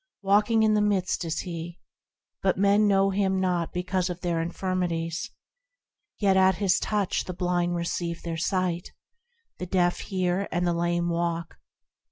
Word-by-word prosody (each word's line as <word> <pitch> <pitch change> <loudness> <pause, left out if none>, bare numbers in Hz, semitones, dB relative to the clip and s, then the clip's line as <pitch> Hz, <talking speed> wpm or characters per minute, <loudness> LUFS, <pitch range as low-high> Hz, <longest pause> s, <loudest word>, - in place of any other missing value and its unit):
Walking 210 +3 +3
in 215 -1 +4
the 210 - +3
midst 195 -3 0
is 160 - -2
He, 170 -1 -6 0.6
But 190 -2 +1
men 200 +2 +4
know 195 -1 +3
Him 190 -1 +1
not 180 -3 0
because 180 +1 -1
of 175 -1 -5
their 170 -2 0
infirmities; 170 +2 -2 0.9
Yet 195 -2 +3
at 190 0 +5
His 190 -1 +2
touch 205 -3 -1
the 180 - -6
blind 175 -1 0
receive 170 0 -3
their 170 -1 -3
sight, 175 0 -1 0.7
The 180 - -4
deaf 175 -1 +1
hear, 185 0 -1
and 175 0 0
the 175 - +1
lame 175 0 0
walk. 170 -1 -2
180 Hz, 155 wpm, -26 LUFS, 170-195 Hz, 0.9 s, at